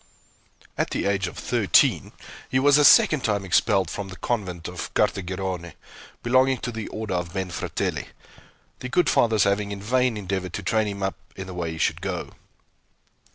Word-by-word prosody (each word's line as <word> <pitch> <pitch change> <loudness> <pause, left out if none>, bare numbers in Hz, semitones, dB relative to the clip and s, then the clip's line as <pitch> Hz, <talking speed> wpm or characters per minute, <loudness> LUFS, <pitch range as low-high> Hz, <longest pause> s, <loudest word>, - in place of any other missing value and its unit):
At - - +1
the - - -2
age 100 -2 0
of 90 - -9
thirteen - - +2 0.4
he 130 - +1
was 145 +2 +5
a - - +5
second 145 -1 +6
time 100 -3 0
expelled 95 0 +2
from 100 - -5
the 95 - -9
convent 90 -7 -3
of - - -6
Cartegirone, 90 -2 -1 0.5
belonging 130 +2 +3
to 120 - -3
the 110 -2 -5
order 110 -3 -5
of 90 -1 -3
Benfratelli, 95 -3 -3 0.7
the 125 - -6
good 175 +7 +2
fathers 110 -3 +3
having 100 +1 0
in 100 - -5
vain 125 +1 +1
endeavored 95 -2 -4
to 100 - -4
train 110 +2 +1
him 100 -1 -4
up 95 - -2 0.2
in 95 - -6
the 95 - -8
way 85 -2 -3
he - - -7
should - - 0
go. - - -4
100 Hz, 175 wpm, -24 LUFS, 95-115 Hz, 0.7 s, second